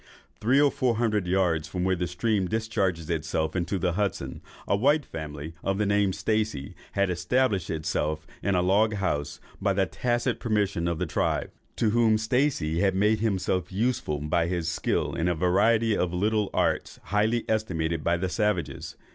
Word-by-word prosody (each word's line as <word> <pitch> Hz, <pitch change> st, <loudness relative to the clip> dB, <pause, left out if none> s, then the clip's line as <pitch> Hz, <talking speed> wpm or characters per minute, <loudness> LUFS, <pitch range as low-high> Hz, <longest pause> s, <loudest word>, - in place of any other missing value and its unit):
Three 130 Hz, +6 st, +3 dB
or 145 Hz, -1 st, +5 dB
four 125 Hz, -3 st, +1 dB
hundred 110 Hz, -5 st, 0 dB
yards 90 Hz, -4 st, +1 dB
from 90 Hz, +2 st, -3 dB
where 95 Hz, 0 st, +2 dB
the 90 Hz, 0 st, -2 dB
stream 95 Hz, +2 st, 0 dB
discharges 95 Hz, -6 st, -1 dB
itself 80 Hz, -1 st, -1 dB
into 90 Hz, +2 st, -1 dB
the 90 Hz, 0 st, 0 dB
Hudson, 100 Hz, +2 st, -2 dB, 0.3 s
a -, -, +3 dB
white 145 Hz, +8 st, +3 dB
family, 75 Hz, 0 st, -7 dB
of 95 Hz, 0 st, 0 dB
the 105 Hz, -, +1 dB
name 100 Hz, -1 st, +2 dB
of 95 Hz, -, -3 dB
Stacey, 110 Hz, -11 st, -1 dB, 0.2 s
had 100 Hz, -1 st, +1 dB
established 95 Hz, +3 st, +1 dB
itself 80 Hz, 0 st, -2 dB, 0.2 s
in 100 Hz, -1 st, +1 dB
a 90 Hz, -, +2 dB
log 105 Hz, +4 st, +3 dB
house, 90 Hz, -8 st, -2 dB, 0.2 s
by 100 Hz, -1 st, +1 dB
tacit 120 Hz, +6 st, -1 dB
permission 100 Hz, -6 st, 0 dB
of 85 Hz, -1 st, -1 dB
the -, -, -1 dB
tribe, -, -, -1 dB, 0.2 s
to 110 Hz, -3 st, +1 dB
whom 115 Hz, -1 st, +4 dB
Stacey 110 Hz, -, 0 dB
had 95 Hz, -1 st, +2 dB
made 105 Hz, +3 st, +3 dB
himself 95 Hz, -4 st, -1 dB
useful 105 Hz, -7 st, 0 dB
by 75 Hz, +3 st, 0 dB
his 85 Hz, -2 st, -2 dB
skill 85 Hz, -, -1 dB
in 85 Hz, -, -1 dB
a 90 Hz, -, +1 dB
variety 105 Hz, +6 st, +3 dB
of 90 Hz, -3 st, 0 dB
little 105 Hz, +2 st, +1 dB
arts -, -, 0 dB
highly 110 Hz, +3 st, +1 dB
estimated 85 Hz, -8 st, -1 dB
by 85 Hz, 0 st, +2 dB
the 95 Hz, +2 st, -1 dB
savages. 90 Hz, -, -2 dB
95 Hz, 175 wpm, -27 LUFS, 85-110 Hz, 0.3 s, or